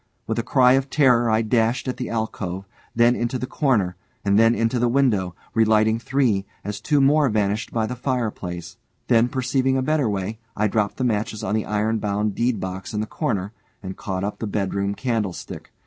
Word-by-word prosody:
With 115 Hz, +1 st, -2 dB
a -, -, +2 dB
cry 125 Hz, +1 st, +4 dB
of 135 Hz, +1 st, +1 dB
terror, 125 Hz, -5 st, +4 dB
I 110 Hz, +1 st, +2 dB
dashed 115 Hz, +3 st, +1 dB
at 130 Hz, -, -2 dB
the 125 Hz, -, -4 dB
alcove, 100 Hz, -4 st, -3 dB, 0.3 s
then 120 Hz, +1 st, +4 dB
into 120 Hz, +2 st, -1 dB
the 130 Hz, -, -3 dB
corner, 115 Hz, -11 st, +1 dB, 0.3 s
and 100 Hz, +1 st, +4 dB
then 115 Hz, +1 st, +5 dB
into 115 Hz, +2 st, 0 dB
the 120 Hz, -, +2 dB
window, 110 Hz, -9 st, +1 dB, 0.2 s
relighting 110 Hz, 0 st, +3 dB
three, 120 Hz, -6 st, +1 dB, 0.2 s
as 105 Hz, 0 st, -5 dB
two 145 Hz, +5 st, +2 dB
more 140 Hz, +1 st, +4 dB
vanished 105 Hz, 0 st, -1 dB
by 115 Hz, -1 st, 0 dB
the 125 Hz, -, -4 dB
fireplace; 110 Hz, -10 st, -3 dB, 0.3 s
then, 120 Hz, -1 st, +5 dB
perceiving 130 Hz, +1 st, 0 dB
a 130 Hz, -, 0 dB
better 150 Hz, -4 st, +1 dB
way, 100 Hz, +2 st, -3 dB, 0.2 s
I 105 Hz, -, +2 dB
dropped 105 Hz, 0 st, -1 dB
the 130 Hz, -, -2 dB
matches 110 Hz, -2 st, -1 dB
on 95 Hz, -, -1 dB
the 110 Hz, -1 st, -1 dB
iron 110 Hz, +1 st, 0 dB
bound 105 Hz, 0 st, -1 dB
deed 120 Hz, -1 st, 0 dB
box 95 Hz, +3 st, -5 dB
in -, -, 0 dB
the 105 Hz, -, -1 dB
corner, 105 Hz, -, -2 dB, 0.3 s
and 95 Hz, 0 st, -6 dB
caught 95 Hz, -2 st, -4 dB
up 105 Hz, -, -3 dB
the 110 Hz, -, -3 dB
bedroom 100 Hz, 0 st, -1 dB
candlestick. 110 Hz, -8 st, -3 dB
110 Hz, 195 wpm, -23 LUFS, 100-125 Hz, 0.3 s, then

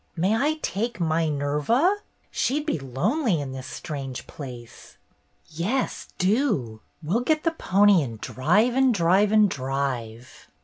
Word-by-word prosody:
"May 190 Hz, +6 st, +1 dB
I 290 Hz, +6 st, +1 dB
take 215 Hz, +4 st, -2 dB
My 160 Hz, -1 st, +1 dB
Nerva? 150 Hz, -, +1 dB, 0.3 s
She'd 295 Hz, +4 st, 0 dB
be 300 Hz, -, -1 dB
lonely 175 Hz, -, 0 dB
in 140 Hz, -2 st, -5 dB
this 130 Hz, 0 st, -7 dB
strange 135 Hz, -5 st, -6 dB
place." 125 Hz, -5 st, -10 dB, 0.5 s
"Yes, 195 Hz, +12 st, -2 dB
do. 185 Hz, -, 0 dB, 0.2 s
We'll 180 Hz, +10 st, +1 dB
get 310 Hz, +4 st, +1 dB
the 330 Hz, -, +2 dB
pony 200 Hz, -, +4 dB
and 115 Hz, -6 st, -5 dB
drive 205 Hz, -, +1 dB
and 260 Hz, -2 st, +3 dB
drive 190 Hz, +4 st, +3 dB
and 215 Hz, -1 st, +5 dB
drive!" 130 Hz, -, -4 dB
170 Hz, 135 wpm, -25 LUFS, -, 0.5 s, and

